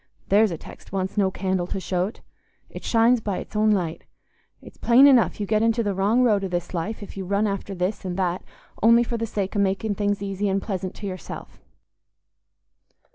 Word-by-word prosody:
There's 210 +2 +5
a 170 - -4
text - - -13
wants 190 0 -2
no 200 -3 +3
candle 185 -2 -2
to 195 - -3
show't; 185 +3 -2 0.5
it - - -9
shines 230 +1 +3
by 205 -3 -2
its - - -8
own 215 +1 +3
light. 180 -6 0 0.6
It's - - -15
plain 245 +4 +6
enough 260 -6 +5
you 205 - -1
get 215 +1 +1
into 230 +1 +2
the 205 -2 -1
wrong 205 +6 +2
road 210 -5 +3
i' - - -1
this 175 -1 -4
life 205 +6 -3
if - - -10
you 195 - -3
run 200 +3 0
after 200 -1 -3
this 185 +4 -2
and 180 -1 -4
that 180 -1 -1 0.4
only 230 +2 +6
for 235 0 -3
the 230 0 -2
sake 200 -1 -3
o' - - +1
making 200 +2 0
things 205 0 -1
easy 200 +1 -2
and 195 +1 +1
pleasant 190 -2 -4
to 210 - -8
yourself. 185 -2 -8
200 Hz, 205 wpm, -24 LUFS, 190-220 Hz, 0.6 s, plain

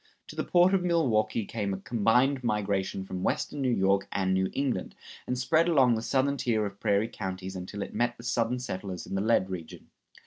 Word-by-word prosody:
To - - -9
the - - -1
port 180 +2 +4
of 190 - +3
Milwaukee 115 - +1
came 100 -3 -3
a - - -7
combined 120 +5 +2
migration 100 -4 -1
from 95 -1 -5
western 145 +8 -1
New 130 - +1
York 100 -3 +2
and 95 -1 0
New 95 0 +1
England, 135 -9 -2 0.3
and 125 - -1
spread 160 +7 +2
along 135 -7 +5
the 110 - -1
southern 140 +4 +1
tier 110 -5 0
of 100 0 -7
prairie 100 +2 +2
counties 95 -2 -6
until 95 +2 -5
it - - -9
met 120 0 0
the 120 - -12
Southern 120 0 0
settlers 95 -7 -5
in - - -8
the 95 - 0
lead 100 -3 +2
region. 85 -4 -8
110 Hz, 205 wpm, -28 LUFS, 95-125 Hz, 0.3 s, along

